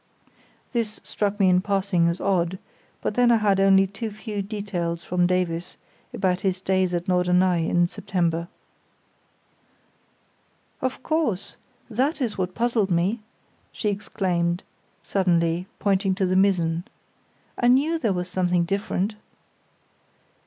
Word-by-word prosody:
This 230 -3 -2
struck 205 0 -2
me 195 - +5
in 180 0 +4
passing 195 -3 +1
as 170 +1 -1
odd; 185 -2 0 0.4
but - - -1
then 245 +2 +4
I - - +6
had 205 -3 +2
only 195 0 +5
too 200 +4 -5
few 210 -1 -5
details 195 -5 -3
from 180 0 +1
Davies 180 -2 -1 0.3
about 190 -6 0
his 190 -2 0
days 185 -1 +1
at 175 +2 -3
Norderney 180 -1 +2
in 175 0 +3
September. 170 -3 -1 2.3
"Of 260 0 -3
course, 300 - -1 0.3
that 260 +8 0
is 240 -6 -1
what 185 -1 -3
puzzled 230 -4 +1
me," 185 +6 +1 0.5
she 210 - -2
exclaimed, 180 -3 -1 0.4
suddenly, 175 -2 +1
pointing 195 -1 +1
to 190 0 +1
the 185 0 +1
mizzen. 175 -3 +2 0.7
"I 240 - +3
knew 290 +7 +3
there 225 -8 +1
was 180 -1 -2
something 180 -1 +1
different." 200 +2 -1
190 Hz, 130 wpm, -24 LUFS, 180-210 Hz, 2.3 s, I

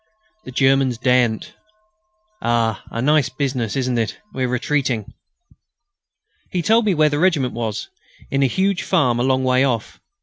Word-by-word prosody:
The 130 - -8
Germans 135 -1 +2
daren't.... 120 -2 +1 0.9
Ah! 115 -3 0
a 115 - -3
nice 145 -1 +3
business, 130 -5 -2
isn't 130 -3 0
it? 115 - -2 0.2
We're 130 -1 -1
retreating." 125 -3 -1 1.4
He 180 -2 -2
told 225 +5 +3
me 195 - +2
where 155 -1 +4
the 145 0 -1
regiment 155 -8 +2
was, 110 -3 -4 0.4
in 135 - +1
a 135 - +4
huge 190 +6 0
farm 130 -10 +1
a - - +1
long 130 0 +1
way 130 0 +3
off. 120 -5 -2
130 Hz, 155 wpm, -20 LUFS, 120-145 Hz, 1.4 s, where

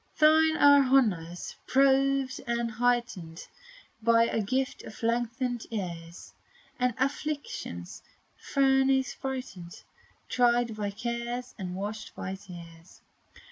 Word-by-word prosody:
Thine 315 0 +5
are 285 0 +7
honors, 205 -11 +1
proved 270 0 +2
and 235 0 -1
heightened 225 -8 -1 0.6
By 230 +1 +4
the 225 - 0
gift 260 +6 -1
of 215 - -11
lengthened 240 +1 -1
years; 170 -5 -6 0.5
In 250 -2 +1
affliction's 275 - -4 0.3
furnace 270 -1 +2
brightened, 255 -10 -6 0.4
Tried 240 -2 +2
by 210 -1 -2
cares, 235 +3 -4
and 180 -2 -4
washed 210 +3 -6
with 190 +2 -6
tears. 170 -2 -13
235 Hz, 100 wpm, -28 LUFS, 195-265 Hz, 0.6 s, are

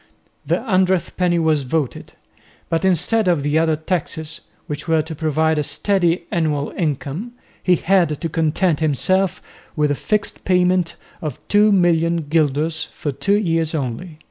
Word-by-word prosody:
The - - 0
"hundredth 185 -5 +1
penny" 180 -1 +1
was 160 -3 +2
voted, 135 0 -3 0.6
but 165 +1 0
instead 190 +4 +2
of 170 -5 +2
the 145 +2 +2
other 160 -1 +2
taxes, 160 -1 -3 0.2
which 150 +2 -6
were 160 -1 +2
to 160 +1 -7
provide 160 0 +1
a - - 0
steady 175 0 0
annual 150 -4 0
income, 160 - -3 0.3
he 180 - +3
had 170 -4 +2
to 165 - -2
content 160 +1 +1
himself 185 +5 +1 0.3
with 150 -2 +1
a - - +3
fixed 210 +8 -2
payment 180 -2 +2 0.3
of 150 -6 -5
2,000,000 170 -6 +3
guilders 155 +1 +1
for 145 - -5
two 200 +9 +1
years 165 -5 0
only. 155 +4 -4
165 Hz, 145 wpm, -20 LUFS, 150-180 Hz, 0.6 s, he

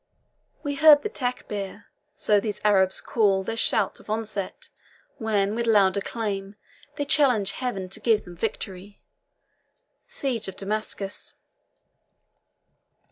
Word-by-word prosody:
We 285 -2 -2
heard 300 0 +7
the 425 - -3
Techir 220 - -4 0.3
so 210 -1 +3
these 205 0 -4
Arabs 190 -2 +3
call 200 -4 +2
Their 225 +4 -3
shout 220 -3 +2
of - - -17
onset, 215 -3 -4 0.5
when, 210 -3 +1
with 235 +1 -1
loud 200 -4 +4
acclaim, 200 -1 -3 0.4
They 290 - -2
challenge 255 -9 +4
Heaven 200 -5 -4
to 195 - -6
give 215 -1 +2
them 175 - -11
victory. 200 0 -5 1.1
SIEGE 245 -7 -2
OF 190 - -6
DAMASCUS. 205 -1 -3
210 Hz, 120 wpm, -25 LUFS, 195-230 Hz, 1.1 s, heard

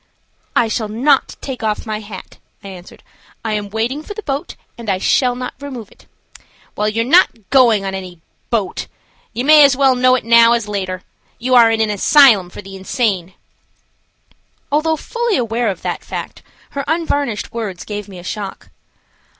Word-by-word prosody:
"I 235 - +3
shall 220 0 -2
not 260 +6 +1
take 265 -3 -6
off 215 -1 -2
my 215 -1 -3
hat," 205 -3 -11 0.2
I 200 - -8
answered. 180 -2 -12 0.4
"I 220 - -1
am 205 -1 -3
waiting 230 +7 -2
for 415 +6 -9
the 430 - -7
boat, 285 +4 -4 0.2
and 230 -3 -7
I 190 - +1
shall 245 +6 +2
not 250 0 -5
remove 260 -7 -8
it." - - -22 0.7
"Well, 210 +1 0
you 225 +2 0
are - - -6
not 250 - +3
going 235 -7 +4
on 195 - -3
any 185 -3 -7 0.3
boat. 210 -6 -2 0.4
You 240 +3 -3
might 305 +1 +8
as 275 -2 +4
well 270 -2 +4
know 255 0 +4
it 255 - -3
now 230 0 +6
as 235 -3 -1
later. 185 -3 -4 0.3
You 255 +2 -1
are 235 -2 +7
in 225 0 +1
an 215 -1 +1
asylum 210 -3 +5
for 190 - -10
the 195 0 -10
insane." 190 -2 -2 1.4
Although 315 +2 +2
fully 470 +6 -2
aware 235 -1 -1
of 195 - -3
that - - -3
fact, - - -7 0.3
her 280 - -3
unvarnished 290 -8 -1
words 210 -6 -5
gave 210 -1 -6
me 190 -2 -11
a 175 - -10
shock. 200 +1 -6
230 Hz, 180 wpm, -17 LUFS, 205-265 Hz, 1.4 s, might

